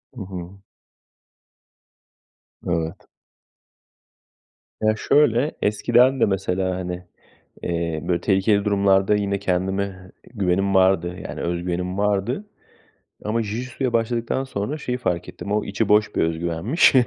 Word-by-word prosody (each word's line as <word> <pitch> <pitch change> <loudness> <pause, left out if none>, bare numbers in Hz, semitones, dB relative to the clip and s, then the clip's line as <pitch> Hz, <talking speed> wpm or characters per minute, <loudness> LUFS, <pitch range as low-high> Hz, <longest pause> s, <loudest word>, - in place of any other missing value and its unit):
Hı 120 - -7
hı. 95 0 -8 2.0
Evet. 85 +1 -2 1.7
Ya 110 0 +3
şöyle: 140 +3 +3
Eskiden 120 +5 +3
de - - +5
mesela, 95 -1 -1
hani, 90 0 -5 0.6
eee, 85 -2 -1
böyle, 85 -1 +1
tehlikeli 100 +1 +2
durumlarda 100 0 +3
yine 100 -1 0
kendime 95 0 -2 0.2
güvenim 95 -1 +1
vardı. 95 -2 +3
Yani - - -6
öz 85 0 -2
güvenim 90 +1 -2
vardı 105 - 0 0.8
ama 115 +2 0
Jijitsu'ya 120 +4 -3
başladıktan 115 +3 0
sonra 130 +3 -3
şeyi 125 -4 -3
fark 90 -9 -2
ettim: 100 - -6
O 105 0 +1
içi 100 +2 -1
boş 105 0 +3
bir - - +3
öz 80 0 0
güvenmiş. 85 - +3
100 Hz, 120 wpm, -23 LUFS, 90-110 Hz, 2.0 s, de